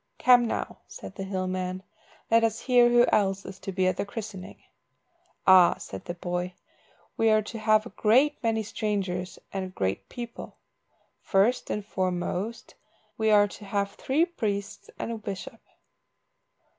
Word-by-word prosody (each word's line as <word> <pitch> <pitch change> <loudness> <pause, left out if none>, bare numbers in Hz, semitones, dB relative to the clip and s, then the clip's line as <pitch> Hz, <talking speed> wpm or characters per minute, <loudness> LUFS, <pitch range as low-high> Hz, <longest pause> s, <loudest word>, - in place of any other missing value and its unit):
"Come 245 -1 +5
now," - - -4
said - - -9
the 195 - -6
hill 190 -1 -2
man, 185 0 -3 0.5
"let 230 0 +5
us 225 0 0
hear 245 -1 +5
who 240 0 +6
else 195 -2 +1
is 190 - -9
to 195 - -5
be 190 0 0
at 185 0 +1
the - - 0
christening." 200 -3 -7 0.9
"Ah," 185 -2 +7
said 95 - -8
the 175 - -5
boy, 180 +1 -3 0.6
"we 225 - +3
are 215 0 +4
to 225 +2 -7
have 215 0 +3
a - - -9
great 260 +7 +3
many 225 -2 0
strangers 195 -4 -3 0.2
and 185 -1 -4
great 95 0 -2
people. 235 -1 -8 0.7
First 210 +6 +2
and 210 -1 -3
foremost, 185 +3 -3 0.4
we 220 0 +1
are 205 -1 +6
to 205 - -11
have 200 0 -1
three 285 +10 +1
priests 205 - -4
and - - -4
a 230 - -4
bishop." 200 -3 -7
205 Hz, 155 wpm, -27 LUFS, 185-225 Hz, 0.9 s, Ah